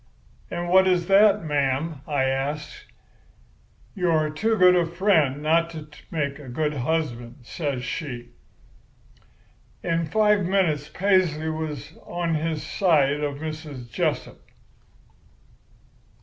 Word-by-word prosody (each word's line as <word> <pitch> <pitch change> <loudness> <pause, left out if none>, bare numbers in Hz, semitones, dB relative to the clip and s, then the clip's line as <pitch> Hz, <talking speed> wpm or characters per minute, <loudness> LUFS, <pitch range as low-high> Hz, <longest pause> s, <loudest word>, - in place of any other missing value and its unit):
"'And 175 0 -4
what 190 +2 +5
is 180 -2 +2
that, 200 0 +5
ma'am?' 145 0 -1
I 145 -3 +1
asks. 135 +3 -3 1.1
"'You 180 -2 0
are 155 -2 +2
too 220 +9 0
good 180 -1 +6
a 175 - +3
friend 165 -5 +1
not 165 +2 +2
to 155 -2 -9 0.2
make 140 -3 -2
a 140 -4 -10
good 150 +4 -1
husband,' 125 -3 -3
says 140 -1 -4
she. 120 -2 -5 1.5
"In 165 -1 0
five 210 +3 +3
minutes 175 -6 +1
Paisley 180 -5 +1
was 155 -2 -5
on 170 -1 -2
his 160 0 -2
side 150 -6 +2
of 145 -1 -2
Mrs. 150 -5 -7
Jessup. - - -2
155 Hz, 120 wpm, -24 LUFS, 145-175 Hz, 1.5 s, good